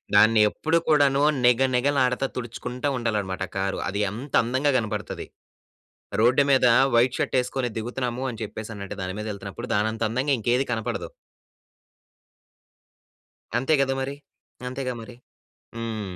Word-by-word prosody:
దాన్ని 110 +1 +6
ఎప్పుడు 160 +8 0
కూడాను 145 -2 +4 0.2
నిగ 125 +1 +5
నిగ 125 +3 +2
లాడతా 125 +1 +1
తుడుచుకుంటా 125 +3 -4
ఉండాలన్నమాట 105 -6 -2
కారు. 95 0 -1
అది 100 +2 -2
అంత 130 +7 -8
అందంగా 130 +5 +1
కనబడతది. 110 -4 -4 0.9
రోడ్డు 125 +5 +5
మీద 130 -2 +4 0.3
వైట్ 120 +2 +4
షర్ట్ - - -1
ఏసుకొని 125 0 -2
దిగుతున్నాము 125 +2 -3
అని 115 - -7
జెప్పేసనంటె 105 -1 -6
దాని 95 0 -3
మీద 105 - -4
యెళ్తున్నప్పుడు 100 +4 -7
దానంత 110 +2 0
అందంగా 130 +5 0
ఇంకేది 120 +4 +1
కనపడదు. 120 0 -2 2.5
అంతే 135 +6 +1
గదా! 135 0 +1
మరి. 135 +1 -3 0.5
అంతేగా 130 0 -3
మరి. 120 +2 -11 0.6
హ్మ్. 110 -5 -4
120 Hz, 125 wpm, -25 LUFS, 110-130 Hz, 2.5 s, దాన్ని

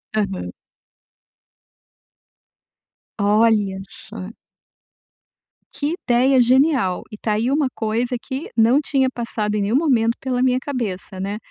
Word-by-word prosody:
Aham. 195 - -2 2.7
Olha 205 -2 +2
só. 185 - -9 1.4
Que 295 +2 -2 0.2
ideia 255 +2 +4
genial, 255 - +2
e 210 - -8
tá 215 0 -1
aí 225 +5 0
uma 290 0 +2
coisa 235 +3 -1
que 270 +3 -6
não 230 +5 +5
tinha 270 -3 +1
passado 230 -4 -3
em 210 - 0
nenhum 205 +4 0
momento 245 -6 +2
pela 255 -2 -2
minha 255 -1 +3
cabeça, 220 -9 -5
né, 200 +2 -3
235 Hz, 115 wpm, -21 LUFS, 210-260 Hz, 2.7 s, não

